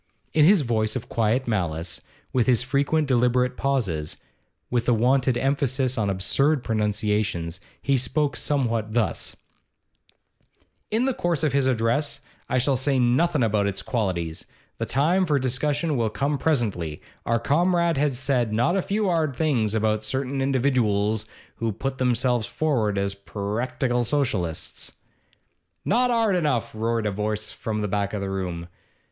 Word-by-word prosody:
In 155 -1 +5
his 190 0 +6
voice 110 -4 0
of 125 -1 -5
quiet 115 +3 +1
malice, 85 -6 -2 0.3
with 125 -3 +2
his 125 -2 +3
frequent 140 +3 +1
deliberate 125 0 +2
pauses, 100 - -1 0.5
with 120 -1 0
the 120 - +4
wonted 125 +2 +2
emphasis 135 -1 0
on 105 -4 0
absurd 135 +9 +1
pronunciations, 105 -5 -1 0.2
he 140 - +1
spoke 130 +2 0
somewhat 115 -7 -1
thus: 115 -4 -1 1.5
'In 225 +4 +1
the 265 - +1
course 170 -7 -1
of 150 - +1
his 140 -1 +2
address 130 +4 0 0.3
I - - +1
shall 135 +2 +2
say 135 +1 +1
nothin' 130 +4 +2
about 105 -2 +2
its 100 -1 -3
qualities, 90 -9 -2 0.3
the - - -2
time 165 +8 +2
for 150 -5 +2
discussion 145 +4 0
will 115 -3 +1
come 140 +5 -1
presently 105 - 0 0.3
our 115 - +3
Comrade 170 +5 +2
has 140 -3 +1
said 125 -4 +1
not 120 - +2
a 195 - +2
few 205 +3 -1
'ard 160 -6 +1
things 120 -9 +1
about 110 -1 +1
certain 130 +4 -2
individooals 110 -6 +1 0.3
who 115 -1 -1
put 130 +6 -4
themselves 125 -3 +1
forward 115 -10 0
as 100 0 0
perractical 115 +5 -2
Socialists 110 - -2 0.5
' - - -48
'Not 245 +4 +3
'ard 225 -5 +2
enough!' 150 -9 0
roared 115 0 -1
a 105 - +1
voice 105 +1 -2
from 110 -3 -4
the 105 - -1
back 100 0 -1
of 105 - -2
the 100 0 -3
room. 90 -3 -4
125 Hz, 150 wpm, -24 LUFS, 105-140 Hz, 1.5 s, his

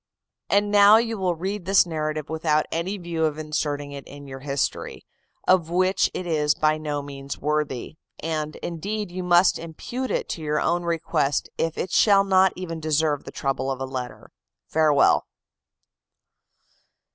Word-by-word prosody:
"And 205 +1 +2
now 205 +1 +8
you 225 -2 -1
will 180 -2 0
read 190 +3 -4
this 195 0 +5
narrative 155 -2 -3
without 155 -1 +1
any 180 +5 -2
view 170 -3 -2
of 155 -1 -1
inserting 150 -2 -3
it 140 -1 -7
in 145 0 -11
your 135 -1 -8
history, 140 0 -3 0.4
of 180 -3 +4
which 185 +2 +2
it 185 - -3
is 150 -3 +1
by 155 0 +1
no 145 -2 -3
means 140 -1 -7
worthy; 150 -1 -2 0.2
and, 155 -1 -3
indeed, 200 +4 -4
you 185 +1 -4
must 180 0 +4
impute 235 +10 -5
it - - -1
to 165 - -4
your 150 0 0
own 175 +1 +1
request 160 -4 0
if 165 -1 -1
it 185 - -3
shall 200 -2 +5
not 190 -1 +4
even 165 -3 -5
deserve 155 -2 0
the - - -8
trouble 135 -1 -2
of 135 -1 -3
a 135 - -2
letter. 130 -2 -7 0.3
Farewell!" 150 -3 +3
160 Hz, 160 wpm, -24 LUFS, 150-185 Hz, 0.4 s, now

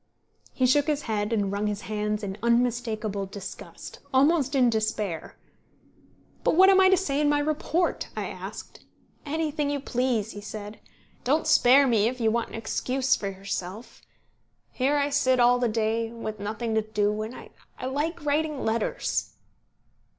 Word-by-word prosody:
He 255 - +1
shook 285 +3 +3
his 295 -1 0
head 210 -1 -2
and 205 -4 0
wrung 205 +1 -1
his 210 0 -3
hands 210 +1 -2
in 195 -1 -4
unmistakable 230 -4 0
disgust, 195 0 -9
almost 280 +1 +3
in 255 -2 +5
despair. 215 -6 -2 1.1
"But - - +2
what 380 +3 +7
am 385 - +5
I 375 - +6
to 380 - +5
say 295 -6 0
in 295 - +3
my 295 - +3
report?" 310 +4 0
I - - -2
asked. - - -9 0.4
"Anything 300 -1 -1
you 285 0 -1
please," 245 -5 -1
he 205 - -8
said. 210 0 -8 0.4
"Don't 295 +5 +1
spare 270 +3 +6
me, 225 -4 +3
if 250 +1 -3
you 225 -2 +2
want 235 0 -1
an - - -9
excuse 255 +3 0
for 200 - -4
yourself. 195 +2 -6 0.7
Here 275 +3 +1
I 285 0 0
sit 260 -3 +2
all 245 +1 +5
the 245 -1 +1
day, 225 +1 -1
with 220 -2 -6
nothing 220 +3 -3
to 220 - +2
do; 210 0 -1
and 220 +4 -5 0.4
I - - -5
like 295 +5 -2
writing 300 -1 0
letters." 225 0 -1
235 Hz, 165 wpm, -26 LUFS, 215-285 Hz, 1.1 s, what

